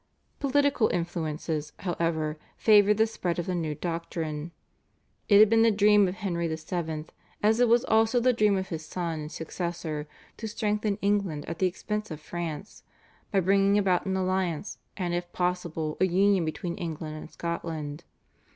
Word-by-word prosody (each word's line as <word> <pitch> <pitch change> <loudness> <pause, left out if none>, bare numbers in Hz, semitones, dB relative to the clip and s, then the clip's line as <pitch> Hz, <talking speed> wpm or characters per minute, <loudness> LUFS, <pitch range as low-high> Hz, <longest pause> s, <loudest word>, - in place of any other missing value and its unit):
Political 285 -4 +3
influences, 160 -3 -3
however, 165 -4 -1 0.2
favoured 210 -1 +5
the 220 - +5
spread 180 -6 -3
of 175 - -2
the 185 - -2
new 160 -4 -2
doctrine. 165 -2 -4 0.8
It 200 - +7
had 215 +1 +9
been 225 +1 +4
the 230 - +6
dream 210 -1 +5
of 180 - -3
Henry 175 -4 -2
VII., 160 -1 -3 0.4
as 220 +2 +4
it 245 - +5
was 240 +2 +4
also 225 +2 +3
the 250 +1 +3
dream 210 -3 +3
of 190 0 -3
his 160 -2 -4
son 165 0 -3
and 150 0 -6
successor, 165 -2 -4 0.3
to 225 - -5
strengthen 210 -1 -1
England 200 -7 0
at 165 - -6
the 185 - +4
expense 210 +4 -4
of 155 -3 -6
France, 170 +3 -6 0.5
by 195 -3 +3
bringing 195 +2 +3
about 195 -2 +2
an 190 0 0
alliance 185 -1 -1 0.2
and 180 -3 -2
if 175 0 -3
possible 170 -3 -2
a - - +6
union 190 0 +3
between 170 +2 -4
England 160 -2 -5
and 155 - -8
Scotland. 165 -3 -4
180 Hz, 165 wpm, -28 LUFS, 160-205 Hz, 0.8 s, had